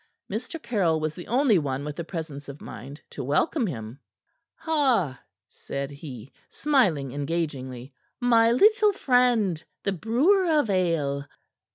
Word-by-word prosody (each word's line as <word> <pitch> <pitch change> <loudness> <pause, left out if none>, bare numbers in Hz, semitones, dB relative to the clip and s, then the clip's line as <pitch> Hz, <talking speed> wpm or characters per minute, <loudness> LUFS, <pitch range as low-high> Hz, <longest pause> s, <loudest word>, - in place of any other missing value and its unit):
Mr. 330 - -4
Caryll 200 - +1
was 155 0 -2
the 175 - -10
only 245 -5 +3
one 140 -1 -3
with 150 -1 -5
the 170 - -4
presence 155 -4 -6
of 140 +1 -9
mind 135 +7 -9
to 140 - -5
welcome 215 - +1
him. 115 - -6 0.6
"Ha!" 255 - +1 0.3
said 140 0 -6
he, 135 -4 -9 0.2
smiling 190 - +1
engagingly. 140 -4 -4 0.3
"My 230 -2 +4
little 425 - +5
friend, 245 - +2 0.2
the 200 - 0
brewer 260 - +2
of 230 -8 0
ale." 155 -7 0
165 Hz, 135 wpm, -26 LUFS, -, 0.6 s, little